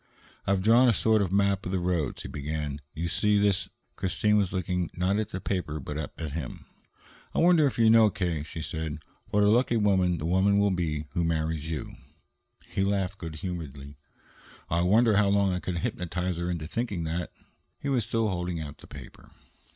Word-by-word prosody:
"I've 95 -1 +2
drawn 120 +4 +6
a - - +4
sort 110 +1 +3
of 95 -3 -1
map 100 -1 +2
of 90 - -4
the 95 - +1
roads," 85 -5 -1
he - - -6
began. 75 0 -4
"You 85 +2 -2
see, 105 +4 +2
this 100 -2 +1
" - - -46
Christine 100 +3 +1
was 100 -3 +2
looking, 90 -2 -1
not 95 +4 +1
at 110 -1 -2
the 95 - -4
paper, 90 -6 -2
but 75 +2 -6
up 75 - -7
at 80 -3 -4
him. 75 -6 -6 0.7
"I - - +2
wonder 170 -3 +5
if 135 - -3
you 115 -1 +5
know, 110 -1 +7
K.," 85 -6 -2
she 80 +1 -6
said, 80 0 -4 0.3
"what 105 0 +3
a - - +5
lucky 120 +2 +3
woman 95 -4 +2
the 75 - -4
woman 95 +4 +3
will 100 0 +3
be 80 -4 -1
who 85 - 0
marries 80 -1 -1
you?" 80 -3 -5 0.7
He 95 - -1
laughed 100 -1 -1
good 80 -2 -6
humoredly. 75 -5 -6 0.8
"I 85 +1 +2
wonder 105 +4 +4
how 100 -1 +4
long 100 -1 +3
I 90 - -1
could 90 -1 -3
hypnotize 90 +1 -2
her 85 +1 -2
into 85 -3 -3
thinking 100 -1 -3
that." 85 +2 -3 0.5
He - - -5
was 130 -4 +1
still 115 +1 0
holding 90 -3 -2
out 75 -2 -7
the - - -14
paper. - - -12
90 Hz, 205 wpm, -28 LUFS, 80-100 Hz, 0.8 s, know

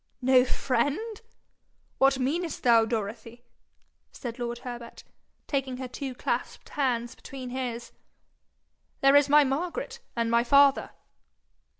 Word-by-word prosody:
'No 255 -1 +5
friend! 285 - -1 0.8
What 270 0 +4
meanest 310 +6 -2
thou, 230 -2 +5
Dorothy?' 230 +2 -5 0.7
said 240 -1 -7
lord 240 0 -3
Herbert, 240 -1 -8 0.4
taking 270 -3 -2
her 260 0 -5
two 260 +1 -6
clasped - - -3
hands 240 -5 -1
between 260 -2 -9
his. 245 -2 -4 1.1
'There 275 +1 +6
is 285 0 +5
my 295 +1 +7
Margaret 330 - -3 0.2
and 230 -1 0
my 235 0 +4
father!' 280 +2 +4
255 Hz, 115 wpm, -27 LUFS, 235-280 Hz, 1.1 s, my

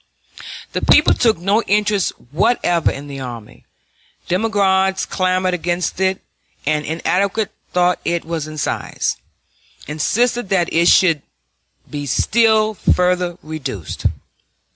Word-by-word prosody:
The - - -2
people - - +5
took 225 -5 +2
no 200 +6 +1
interest 210 -2 +1 0.2
whatever 175 -1 +2
in 140 +1 -6
the 140 -1 -7
army; 120 -4 -9 0.6
demagogues 190 -1 +1
clamored 185 -1 0
against 175 0 -2
it, 190 +1 0 0.4
and, 150 +1 +1
inadequate 195 +6 0 0.2
though 180 0 +3
it 170 0 -1
was 160 -2 -3
in 155 0 -8
size, 145 - -2 0.7
insisted 230 +9 0
that 180 -4 +1
it 170 +1 +3
should 165 -7 +5 0.7
be 145 -1 -5
still 220 - +3
further 180 -3 +1
reduced. 140 - -4
180 Hz, 115 wpm, -19 LUFS, 155-200 Hz, 0.7 s, people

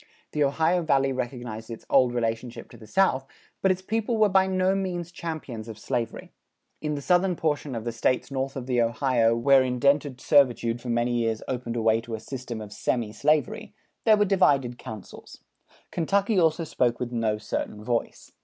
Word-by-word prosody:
The 150 - +1
Ohio 160 +5 +2
Valley 135 -4 +2
recognized 120 -3 -5
its 115 - -8
old 130 -3 +4
relationship 115 0 -3
to - - -12
the 110 - -14
South, 135 - +2 0.3
but 190 - +3
its 185 0 0
people 225 +3 -1
were 215 -1 +4
by 190 0 +4
no 185 0 +2
means 180 -3 -3
champions 155 -10 -6
of 110 -2 -8
slavery. 115 +1 -4 0.5
In 150 -1 -2
the 140 - -5
southern 180 +2 +3
portion 150 -4 -1
of 115 - -4
the 120 - -2
States 125 +4 0
north 135 0 -2
of 130 -3 -5
the 125 -2 +1
Ohio 115 -1 +2
where 135 +3 +5
indented 130 +1 +1
servitude 120 -5 +3
for 125 - -6
many 120 +1 +1
years 115 -1 -1
opened 120 -2 -3
a 115 - -1
way 110 0 +3
to 115 -1 -5
a - - -7
system 120 -1 -6
of 105 -1 -9
semi 115 0 -1
slavery, 150 0 0 0.3
there 215 -1 +5
were 205 - +3
divided 140 -11 +2
counsels. 110 -3 -10 0.5
Kentucky 200 +4 +1
also 165 0 +2
spoke 125 -6 0
with 125 -1 -3
no 115 -3 0
certain 105 0 -4
voice. 120 +1 -3
130 Hz, 185 wpm, -26 LUFS, 115-160 Hz, 0.5 s, where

